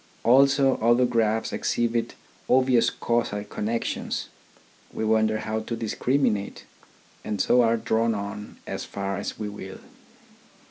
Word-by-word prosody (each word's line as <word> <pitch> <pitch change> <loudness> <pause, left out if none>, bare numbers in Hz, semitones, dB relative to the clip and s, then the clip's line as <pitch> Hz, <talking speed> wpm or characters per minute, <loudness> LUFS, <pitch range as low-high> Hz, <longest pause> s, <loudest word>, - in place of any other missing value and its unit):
Also 135 +2 +5
other 120 +2 +3
graphs 110 -2 0
exhibit 120 0 -1 0.3
obvious 130 -2 +4
casual 115 -3 -1
connections. 110 +2 -3 0.6
We 110 - -3
wonder 110 0 +2
how 110 +1 -2
to 115 +2 -4
discriminate. 115 -1 -1 0.6
And 105 -2 -3
so 125 - +4
are 115 0 +3
drawn 115 0 +1
on 100 +1 -6
as - - -5
far 100 0 -4
as - - -5
we 105 - -4
will. 95 -2 -8
115 Hz, 125 wpm, -25 LUFS, 105-120 Hz, 0.6 s, Also